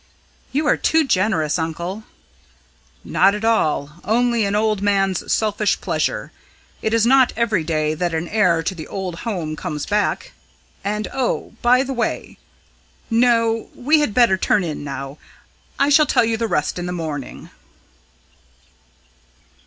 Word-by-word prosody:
"You 300 Hz, +3 st, 0 dB
are -, -, +3 dB
too 320 Hz, -1 st, +2 dB
generous, 185 Hz, -, +1 dB
uncle!" 170 Hz, +6 st, -4 dB, 1.0 s
"Not 195 Hz, +2 st, +3 dB
at 210 Hz, +2 st, -4 dB
all. 155 Hz, -7 st, 0 dB
Only 235 Hz, +2 st, +1 dB
an 200 Hz, +1 st, -1 dB
old 215 Hz, -1 st, +1 dB
man's 195 Hz, -2 st, 0 dB
selfish 210 Hz, -1 st, +1 dB
pleasure. -, -, -2 dB, 0.5 s
It 220 Hz, -, -1 dB
is 230 Hz, 0 st, +3 dB
not 260 Hz, 0 st, +5 dB
every 215 Hz, -7 st, +1 dB
day 155 Hz, -1 st, 0 dB
that 175 Hz, +2 st, -2 dB
an 165 Hz, +1 st, -2 dB
heir 180 Hz, -6 st, +2 dB
to 175 Hz, -, -2 dB
the 160 Hz, -4 st, -8 dB
old 185 Hz, -3 st, -5 dB
home 165 Hz, -7 st, -3 dB
comes 150 Hz, -3 st, -4 dB
back. 210 Hz, 0 st, -1 dB, 0.5 s
And 210 Hz, +2 st, -2 dB
oh, 260 Hz, -4 st, -2 dB
by 250 Hz, +2 st, +4 dB
the 270 Hz, 0 st, -4 dB
way... 235 Hz, -3 st, -3 dB, 0.7 s
No, 230 Hz, -1 st, +2 dB
we 300 Hz, +5 st, +3 dB
had 290 Hz, -9 st, -1 dB
better 235 Hz, -6 st, +4 dB
turn 205 Hz, 0 st, +2 dB
in 155 Hz, -4 st, -4 dB
now 135 Hz, 0 st, -6 dB, 0.6 s
I 280 Hz, -, +2 dB
shall 295 Hz, +1 st, +5 dB
tell 235 Hz, -, +3 dB
you 225 Hz, 0 st, 0 dB
the 230 Hz, 0 st, -1 dB
rest 175 Hz, -3 st, -1 dB
in 175 Hz, -, -4 dB
the -, -, -3 dB
morning." 155 Hz, -6 st, -6 dB
205 Hz, 150 wpm, -20 LUFS, 170-230 Hz, 1.0 s, not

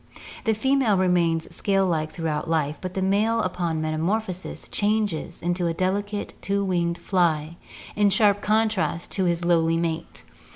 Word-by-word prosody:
The 220 Hz, -1 st, +2 dB
female 260 Hz, -3 st, +2 dB
remains 170 Hz, -3 st, +1 dB
scale 195 Hz, -1 st, +1 dB
like 160 Hz, -4 st, 0 dB
throughout 160 Hz, -1 st, -3 dB
life 155 Hz, -2 st, 0 dB
but 185 Hz, -1 st, -5 dB
the 190 Hz, -, 0 dB
male 210 Hz, +4 st, +2 dB
upon 170 Hz, -3 st, -2 dB
metamorphosis 180 Hz, +5 st, -2 dB
changes 205 Hz, -6 st, -1 dB
into 175 Hz, 0 st, 0 dB
a 165 Hz, -, -1 dB
delicate 205 Hz, +3 st, -2 dB
two 200 Hz, 0 st, 0 dB
winged 170 Hz, -2 st, 0 dB
fly 170 Hz, -3 st, 0 dB, 0.4 s
in 205 Hz, 0 st, +4 dB
sharp 205 Hz, +1 st, +3 dB
contrast 215 Hz, -5 st, 0 dB
to 190 Hz, -, 0 dB
his 170 Hz, 0 st, 0 dB
lowly 165 Hz, -1 st, +3 dB
mate. 165 Hz, 0 st, -3 dB
180 Hz, 150 wpm, -24 LUFS, 165-205 Hz, 0.4 s, in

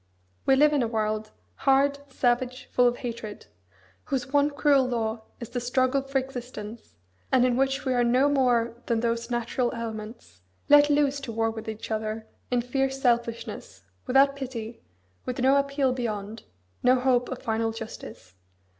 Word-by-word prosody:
We 270 Hz, -, +6 dB
live 300 Hz, +2 st, +5 dB
in 290 Hz, -, +2 dB
a 235 Hz, -, +1 dB
world, 215 Hz, -1 st, -2 dB, 0.3 s
hard, 280 Hz, +1 st, +3 dB
savage, 250 Hz, 0 st, 0 dB
full 250 Hz, 0 st, +4 dB
of 245 Hz, 0 st, 0 dB
hatred; 225 Hz, -3 st, -6 dB, 0.6 s
whose 265 Hz, 0 st, -3 dB
one 285 Hz, 0 st, +4 dB
cruel 285 Hz, -2 st, +3 dB
law 225 Hz, -2 st, -2 dB, 0.2 s
is 235 Hz, -, -7 dB
the 245 Hz, -, -3 dB
struggle 255 Hz, +2 st, +1 dB
for 275 Hz, 0 st, -2 dB
existence, 245 Hz, -4 st, -6 dB, 0.4 s
and 255 Hz, -1 st, +5 dB
in 250 Hz, -1 st, +2 dB
which 270 Hz, +2 st, 0 dB
we 260 Hz, -, +1 dB
are 245 Hz, -1 st, +2 dB
no 250 Hz, +4 st, +3 dB
more 245 Hz, -4 st, +1 dB
than 230 Hz, -2 st, +1 dB
those 235 Hz, 0 st, -1 dB
natural 240 Hz, +1 st, -1 dB
elements, 220 Hz, -, -7 dB, 0.3 s
let 290 Hz, 0 st, +7 dB
loose 285 Hz, -1 st, +2 dB
to 275 Hz, -4 st, -6 dB
war 225 Hz, 0 st, 0 dB
with 220 Hz, 0 st, -7 dB
each 220 Hz, +1 st, -7 dB
other 220 Hz, 0 st, -3 dB, 0.2 s
in 245 Hz, -1 st, +1 dB
fierce 270 Hz, +2 st, -1 dB
selfishness, 235 Hz, -2 st, -1 dB, 0.2 s
without 275 Hz, +2 st, +4 dB
pity, 240 Hz, -4 st, -6 dB, 0.5 s
with 250 Hz, -, -3 dB
no 265 Hz, +2 st, +4 dB
appeal 275 Hz, -2 st, +1 dB
beyond, 220 Hz, -3 st, -4 dB, 0.4 s
no 250 Hz, +1 st, +5 dB
hope 250 Hz, -1 st, +2 dB
of 260 Hz, -, -4 dB
final 225 Hz, 0 st, 0 dB
justice. 220 Hz, -, -9 dB
245 Hz, 165 wpm, -26 LUFS, 225-270 Hz, 0.6 s, let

